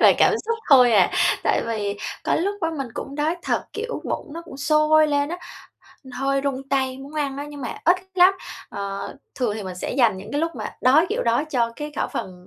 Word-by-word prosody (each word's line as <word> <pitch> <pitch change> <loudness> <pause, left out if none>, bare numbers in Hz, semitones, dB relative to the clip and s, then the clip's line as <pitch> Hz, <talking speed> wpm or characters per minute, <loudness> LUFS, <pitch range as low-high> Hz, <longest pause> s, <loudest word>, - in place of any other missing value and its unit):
là - - +8
cảm - - +5
xúc 460 0 -1
thôi 250 -3 +7
à. 195 -5 +5 0.3
Tại - - +2
vì 205 -3 -2 0.3
có - - +2
lúc 395 +4 0
á 330 - 0
mình 270 -3 -3
cũng 275 - -6
đói 305 +4 0
thật, - - -1
kiểu, 470 +3 -4
bụng 290 - -4
nó 335 +1 -6
cũng - - -10
sôi 305 +2 +4
lên 285 0 +1
á, 350 +2 -4 0.7
hơi 275 +1 0
run 270 -1 -3
tay 265 -1 0
muốn 275 +3 -10
ăn 285 -3 -1
á, 285 - -4
nhưng 290 -1 -9
mà 250 - -4
ít 350 +2 +5 0.2
lắm. 370 +1 +6 0.3
Ờ, 200 0 -5 0.2
thường 245 -6 -1
thì 215 - -5
mình 185 -2 -6
sẽ - - -4
dành 235 -6 +3
những 190 - -9
cái 290 - 0
lúc 330 0 -1
mà - - -5
đói, 290 +7 +5
kiểu, - - -1
đói 235 +5 +2
cho 240 -7 0
cái 295 0 -6
khẩu - - -1
phần 180 -1 -6
275 Hz, 230 wpm, -23 LUFS, 235-310 Hz, 0.7 s, là